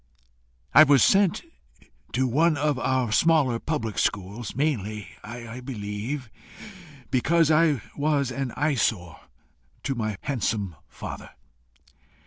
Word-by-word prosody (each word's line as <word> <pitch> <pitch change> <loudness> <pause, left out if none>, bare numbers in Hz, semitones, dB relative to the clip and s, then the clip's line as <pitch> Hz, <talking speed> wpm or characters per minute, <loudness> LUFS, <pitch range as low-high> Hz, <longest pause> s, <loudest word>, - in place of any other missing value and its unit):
"I 140 - +9
was 140 -3 +5
sent 195 -3 +3 0.7
to 130 +2 +1
one 155 +5 +2
of 145 -2 0
our 130 -3 0
smaller 145 -4 +3
public 130 -9 -3
schools 105 +4 -2
mainly, 110 -8 -2
I 120 +2 -8
believe, 120 +2 -5 0.8
because 160 +5 +3
I 155 -5 +3
was 145 -3 0
an 135 -1 -3
eyesore 110 - 0 0.6
to 135 - -1
my 110 -5 -3
handsome 105 - -2
father. - - -8
130 Hz, 110 wpm, -25 LUFS, 110-150 Hz, 0.8 s, I